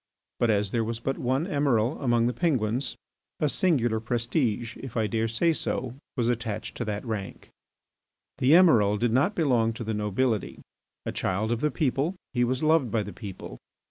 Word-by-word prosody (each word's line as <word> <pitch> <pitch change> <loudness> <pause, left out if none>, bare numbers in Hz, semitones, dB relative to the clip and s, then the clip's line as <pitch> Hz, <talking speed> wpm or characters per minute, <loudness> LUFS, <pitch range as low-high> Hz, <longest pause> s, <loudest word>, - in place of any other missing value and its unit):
But 120 - +2
as 105 -2 +1
there 115 -1 +1
was 115 +1 -3
but 135 +3 -2
one 130 +5 0
Emiral 140 - +1
among 120 -3 +2
the 120 - +1
Penguins, 130 -6 0 0.4
a 150 - +2
singular 135 - +1
prestige, 120 0 -1
if 130 -3 -7
I 110 - +2
dare 115 +1 0
say 140 +10 +2
so, 130 -5 -3 0.2
was 120 -2 +1
attached 115 -3 -2
to 120 - -2
that 105 +1 -3
rank. 105 -4 -5 0.9
The 130 +4 +4
Emiral 115 - +5
did 120 +1 +1
not 140 - +2
belong 120 -8 +2
to 115 - -6
the 110 0 -2
nobility. 105 +2 -1 0.5
A - - -2
child 100 +4 -1
of 120 0 -1
the 150 - +2
people, 150 +3 0 0.2
he 120 -1 +2
was 130 +4 -1
loved 155 -5 +3
by 110 -2 0
the 105 - -8
people. 95 - -8
120 Hz, 180 wpm, -27 LUFS, 110-135 Hz, 0.9 s, Emiral